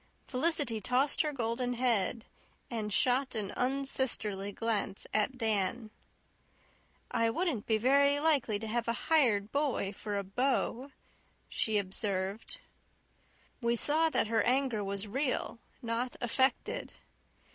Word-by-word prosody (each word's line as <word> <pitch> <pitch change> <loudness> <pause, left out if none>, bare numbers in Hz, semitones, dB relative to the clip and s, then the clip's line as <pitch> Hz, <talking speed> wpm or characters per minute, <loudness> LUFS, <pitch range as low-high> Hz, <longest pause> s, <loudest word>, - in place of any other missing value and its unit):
Felicity 275 -5 0
tossed 255 +6 +2
her 305 - -1
golden 245 -1 -1
head 235 -2 +1 0.5
and 215 -3 -3
shot 255 +4 +2
an 205 -3 -3
unsisterly 250 -6 0
glance 205 -2 -2
at 215 +5 +1
Dan. 220 0 0 1.2
"I 230 0 +2
wouldn't 285 - -1
be 220 - +3
very 280 +5 +4
likely 290 -9 +2
to 220 - -6
have 235 +2 -1
a 230 - +1 0.2
hired 220 -9 +3
boy 280 -9 0
for 205 0 -4
a 200 - -1
beau," 250 +5 -1 0.6
she 220 -1 0
observed. 195 +1 -3 1.0
We 235 0 +2
saw 315 +6 +3
that - - +1
her 225 +1 +1
anger 250 -4 +1
was 200 +1 -2
real, 255 +1 -1 0.2
not 235 +2 -2
affected. 260 +3 0
235 Hz, 125 wpm, -32 LUFS, 210-265 Hz, 1.2 s, very